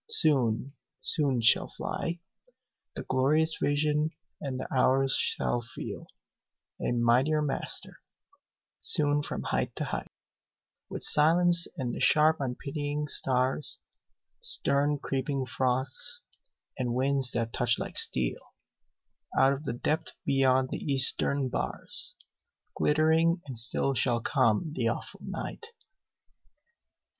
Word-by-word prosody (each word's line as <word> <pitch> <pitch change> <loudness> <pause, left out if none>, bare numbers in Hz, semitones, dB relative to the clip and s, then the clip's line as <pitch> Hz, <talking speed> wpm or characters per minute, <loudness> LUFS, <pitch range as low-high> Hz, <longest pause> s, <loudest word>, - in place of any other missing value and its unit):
Soon, 135 - +2 0.3
soon 140 -7 +2
shall 115 - +5
fly 170 +1 -4 0.8
The - - -5
glorious 155 +5 +2
vision, 150 +1 +1 0.3
and 135 -3 -4
the - - -4
hours 135 +1 +3
shall 120 - 0
feel 115 - -8 0.7
A - - 0
mightier 125 +6 +2
master; 140 -2 -3 0.8
soon 145 -1 +3
from 145 - -5
height - - -2
to - - -3
height, - - -5 0.8
With - - -6
silence 170 +3 +4
and 125 -3 -2
the - - -5
sharp 155 +1 +5
unpitying 145 +3 -3
stars, 130 +2 +1 0.6
Stern 145 +1 0
creeping 135 0 -2
frosts, 130 - -1 0.6
and 120 -2 -1
winds 135 0 +2
that 115 -1 -2
touch 120 -1 +1
like - - -2
steel, 60 -1 -3 0.8
Out 135 +1 +5
of 140 +3 -6
the - - -2
depth 150 +6 -2
beyond 130 -1 +3
the - - -3
eastern 135 0 +1
bars, - - -3 0.6
Glittering 160 +3 +3
and 135 -3 -7
still 115 +4 0
shall 120 -2 +1
come 130 +4 +1
the 120 -6 -1
awful 115 - -4
night. 450 - -6
135 Hz, 115 wpm, -29 LUFS, 125-150 Hz, 0.8 s, shall